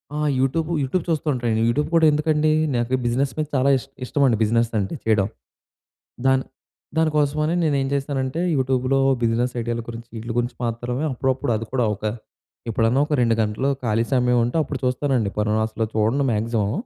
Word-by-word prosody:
ఆ! - - -2 0.2
YouTube, 155 +5 0
YouTube 145 +6 -1
చూస్తా 160 -1 -1
ఉంటానండి. 115 -3 0
యూట్యూబ్ 145 +6 0
కూడా 165 -1 +5
ఎందుకండీ, 155 0 +2 0.2
నాకు 120 +1 -1
ఈ - - -5
బిజినెస్ 130 +3 +1
మీద 155 - -1
చాలా 130 +1 +3
ఇష్ 135 - -9 0.2
ఇష్టమండి 130 -5 +2
బిజినెస్ 115 +1 +2
అంటే 95 - -3
చెయ్యడం. 105 -3 +2 1.0
దాన్ 130 0 +3 0.5
దాని 160 -1 +3
కోసమని 150 +3 +1
నేను 150 -3 +2
ఏం 135 - -1
చేస్తానంటే, 135 +2 -2
యూట్యూబ్‌లో 130 0 +1 0.2
బిజినెస్ 120 +2 +1
ఐడియాల 120 0 -2
గురించి, 115 0 -8
ఈట్లి 115 +1 -5
గురించి 120 0 -1
మాత్రమే 120 +4 -3
అప్పుడప్పుడు 130 -1 -1
అది 115 +1 -3
కూడా 125 -3 +2
ఒక 100 - -20 0.7
ఎప్పుడన్నా 115 +4 +2
ఒక - - -2
2 115 -1 +3
గంటలు 110 +6 0
ఖాళీ 115 0 +1
సమయం 125 -1 +3
ఉంటే, 120 - -4
అప్పుడు 140 -2 -5
చూస్తానండి. 125 -4 0
పను 105 +1 +1
అసలు 110 0 -2
చూడను 115 +6 +2
మ్యాక్సిమం. 110 -1 0
125 Hz, 170 wpm, -22 LUFS, 115-140 Hz, 1.0 s, కూడా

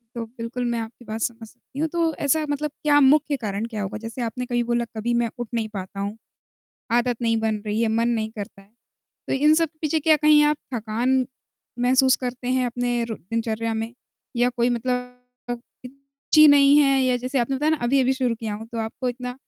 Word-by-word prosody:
तो 230 - -3
बिल्कुल, 230 +2 -5
मैं 235 -1 -1
आपकी 225 +2 -7
बात 220 +1 -5
समझ 225 0 -3
सकती 245 +3 -15
हूँ, 320 - +1
तो 330 -1 0
ऐसा 310 +2 +2
मतलब 295 +1 -2
क्या 295 -1 +4
मुख्य 290 +1 +4
कारण 205 0 -3
क्या 220 -3 -5
होगा? 210 +2 -4
जैसे 230 +2 -6
आपने 240 +2 -3
कहीं 240 -1 0
बोला, 235 0 0
"कभी 235 +2 -1
मैं 235 -1 +1
उठ 240 -2 -4
नहीं 225 -2 -1
पाता 195 -1 -7
हूँ, 200 +2 -3 0.8
आदत 240 0 +2
नहीं 230 -1 +2
बन 220 -1 -1
रही 210 +1 -1
है, 230 - +2
मन 230 +2 +1
नहीं 220 -2 -1
करता।" 205 -2 -8 0.7
तो - - -1
इन 300 +3 +4
सब 330 0 +2
पीछे 315 +1 +1
क्या 310 +1 +4
कहीं 300 0 +5
आप 300 0 +2 0.2
थकान 240 +3 0 0.5
महसूस 260 +1 +4
करते 250 0 -5
हैं 255 0 +1
अपने 245 0 -1
रो 225 -2 -5
दिनचर्या 225 +2 -3
में? 225 +1 -3 0.4
या 245 +1 +3
कोई 240 0 +2
मतलब 250 +1 -2 1.1
ची 305 0 +9
नहीं 285 0 +6
है, 275 -2 +4
या 255 -1 +2
जैसे 255 +3 -2
आपने 260 +2 0
बताया 300 +3 +1
ना, 315 - +2
अभी-अभी 260 +1 +3
शुरू 255 -3 0
किया 220 -2 -5
हूँ, 220 +2 -8
तो 230 - -4
आपको 225 +3 -3
इतना 250 0 -4
240 Hz, 205 wpm, -23 LUFS, 225-265 Hz, 1.1 s, ची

